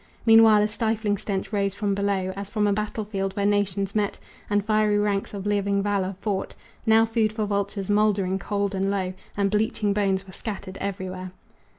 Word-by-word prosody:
Meanwhile 225 -2 +7
a - - +2
stifling 220 -1 0
stench 195 +1 -3
rose 200 -1 0
from 205 -1 0
below 195 -2 0
As 200 0 -6
from 210 -1 0
a 205 - +3
battle 215 +1 -3
field 195 -2 -3
where 200 - 0
nations 200 -1 +1
met 210 -2 0 0.3
And 205 -1 +1
fiery 215 -1 +2
ranks 205 -1 0
of 200 -1 -6
living 200 -1 +1
valor 200 -2 0
fought, 200 -3 -2 0.3
Now 225 0 +6
food 225 -1 +1
for 215 -1 -2
vultures, 200 -1 -2
moldering 205 -2 +2
cold 200 +1 -1
and 195 0 0
low 190 -2 -1 0.2
And 200 -1 +1
bleaching 210 -1 +1
bones 195 -2 0
were 185 - -13
scattered 200 -3 -6
everywhere. 185 -2 -5
200 Hz, 185 wpm, -25 LUFS, 195-210 Hz, 0.3 s, Meanwhile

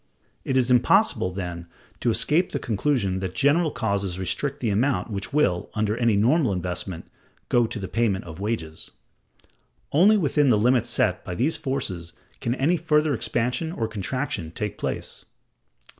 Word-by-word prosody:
It 130 - 0
is 125 -1 +2
impossible, 125 - +3
then, 90 -2 -6 0.3
to - - +1
escape 160 +9 +2
the - - 0
conclusion 110 -5 0
that 95 -1 -4
general 150 - +3
causes 100 -7 -2
restrict 135 +10 -2
the 115 -5 0
amount 120 +3 0
which 100 +5 -4
will, 135 -12 +1
under 110 0 0
any 115 -3 +2
normal 125 +2 +3
investment, 90 -1 -4 0.4
go 120 -2 +3
to 115 - -5
the 95 -2 -4
payment 110 -5 0
of 80 0 -9
wages. 95 -7 -4 1.0
Only 195 +8 +5
within 150 -5 +2
the 110 - +5
limits 120 +2 +2
set 100 -5 +1
by 90 - -5
these 140 - +1
forces 95 - -4 0.3
can 120 +1 -1
any 155 +7 +2
further 155 -2 +2
expansion 125 +6 -1
or 115 -10 -2
contraction 110 - -3
take 105 +5 -5
place. - - -4
115 Hz, 160 wpm, -24 LUFS, 95-140 Hz, 1.0 s, Only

